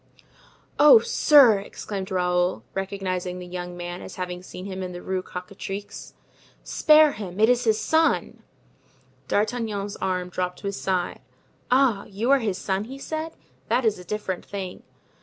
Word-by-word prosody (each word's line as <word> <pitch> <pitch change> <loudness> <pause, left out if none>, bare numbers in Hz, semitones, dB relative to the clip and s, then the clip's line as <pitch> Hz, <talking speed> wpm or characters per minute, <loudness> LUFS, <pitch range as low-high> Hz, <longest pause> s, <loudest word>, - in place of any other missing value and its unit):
"Oh, 300 +9 +9
sir!" 290 - +5
exclaimed 195 -1 -6
Raoul, 180 0 0
recognizing 185 -2 -3
the 180 - -7
young 175 0 -6
man 175 0 -6
as - - -9
having 180 -1 -5
seen 185 0 -9
him 190 -1 -5
in 180 -1 -5
the 175 - -7
Rue 190 -1 -2
Cocatrix, 195 +2 -7 0.5
"spare 305 -1 +5
him! 195 -4 -7
it 220 +2 +5
is 250 0 +2
his 220 -1 +3
son!" 320 0 +1 0.9
D'Artagnan's 210 -2 -1
arm 180 -1 -2
dropped 180 0 -3
to - - -10
his 200 0 -3
side. 185 -2 -1 0.5
"Ah, 250 -6 +3
you 215 +6 -1
are 280 - +6
his 210 -6 -2
son!" 195 +1 -2
he 265 +4 -8
said; 315 +3 -5 0.3
"that 240 +2 +1
is 215 -4 +1
a - - -9
different 190 -1 -4
thing." 190 -2 -6
195 Hz, 160 wpm, -25 LUFS, 180-230 Hz, 0.9 s, Oh